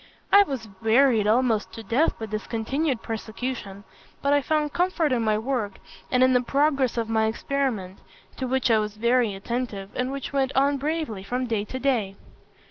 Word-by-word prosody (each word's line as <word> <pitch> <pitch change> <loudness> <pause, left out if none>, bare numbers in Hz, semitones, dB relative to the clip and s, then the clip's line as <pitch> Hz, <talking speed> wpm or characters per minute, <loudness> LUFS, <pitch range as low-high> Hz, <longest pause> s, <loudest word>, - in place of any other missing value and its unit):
I 400 - +9
was 270 - -2
wearied 225 -1 +4
almost 225 -1 +2
to 225 - -8
death 265 +9 +1
by 225 - -5
this 215 0 -5
continued 260 +4 -1
persecution; 220 -2 -5 0.4
but 280 +1 +3
I 290 - +4
found 300 +1 0
comfort 350 -4 +1
in 245 -2 +1
my 215 -1 +2
work 220 -4 -2 0.3
and 255 0 +3
in 260 0 +5
the 250 - +4
progress 275 -1 +1
of 230 -1 0
my 220 -1 +2
experiment, 220 -6 -2 0.4
to 260 - -2
which 260 -1 +1
I 220 - +5
was 210 -1 -3
very 235 -2 +2
attentive, 205 -2 -4
and 250 +1 -1
which 275 0 -5
went 270 -1 +1
on 280 +1 +3
bravely 300 -8 -2
from 245 +6 -2
day 220 -4 -1
to 260 - -6
day. 240 -8 0
245 Hz, 185 wpm, -25 LUFS, 220-275 Hz, 0.4 s, I